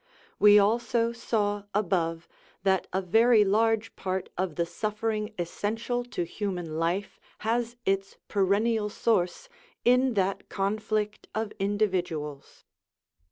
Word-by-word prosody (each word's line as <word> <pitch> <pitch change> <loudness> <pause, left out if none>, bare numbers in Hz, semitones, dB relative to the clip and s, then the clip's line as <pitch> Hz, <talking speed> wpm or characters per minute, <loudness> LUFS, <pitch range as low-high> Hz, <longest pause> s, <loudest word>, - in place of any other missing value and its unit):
We 210 0 +8
also 230 +3 +2
saw 205 -3 -1
above 170 -5 0 0.4
that 190 -2 +2
a 190 +1 -1
very 225 +3 +5
large 225 +2 +1
part 185 0 -3
of 180 -3 -2
the 170 - 0
suffering 215 +3 -2
essential 225 +7 -2
to 210 -7 -3
human 175 -3 -4
life 175 +5 -1 0.3
has 235 +1 0
its 195 0 -1
perennial 210 +2 +1
source 210 - 0 0.4
in 250 0 +4
that 195 0 -1
conflict 210 +1 -2
of 220 -1 -2
individuals. 180 -8 -2
205 Hz, 115 wpm, -28 LUFS, 185-225 Hz, 0.4 s, We